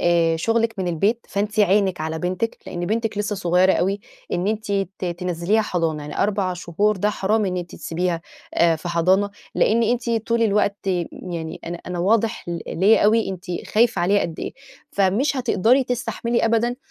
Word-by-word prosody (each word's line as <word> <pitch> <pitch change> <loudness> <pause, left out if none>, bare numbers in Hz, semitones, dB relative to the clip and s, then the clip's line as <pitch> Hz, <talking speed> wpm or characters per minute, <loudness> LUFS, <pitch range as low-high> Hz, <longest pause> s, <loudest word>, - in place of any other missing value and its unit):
آآ، 170 -1 +3
شُغلِك 225 +5 +1
من 180 -2 -1
البيت، 205 +8 0
فأنتِ 210 +2 -1
عينِك 195 -3 +3
على 160 +1 -3
بنتِك؛ 185 +6 -2
لأن 175 0 -4
بنتِك 220 0 -1
لسه 205 0 -1
صغيرة 180 +1 +3
أوي، 195 +3 0 0.3
إن 180 +2 0
أنتِ 215 -1 -2
ت 195 -1 -2
تِنَزِّليها 180 +4 0
حضانة، 165 -6 -1
يعني 150 0 -7
4 195 -2 0
شهور 195 +4 0
ده 210 +3 +1
حرام، 210 +2 +1
إن 185 -1 -1
أنتِ 175 -1 -5
تسيبيها، 170 0 -2 0.3
آآ، 165 -1 +4
في 175 +3 -7
حضانة، 185 +4 +2 0.2
لإن 230 +2 +3
أنتِ 235 +1 0
طول 230 +1 +1
الوقت 205 -1 +2 0.4
يعني 165 -3 -6
أنا 170 +1 -5
أنا 180 -1 -4
واضح 220 +2 +1
ل 170 -1 -2
ليَّ 205 +5 +4
أوي، 220 0 +3
أنتِ 185 -2 -6 0.2
خايفة 220 -5 +2
عليها 200 +3 +3
قد 165 -2 -4
إيه، - - -4 0.4
فمش 205 +9 +2
هتقدري 250 +1 +3
تستحملي 240 -1 -1
أبدًا 230 +2 +1
195 Hz, 175 wpm, -22 LUFS, 175-220 Hz, 0.4 s, آآ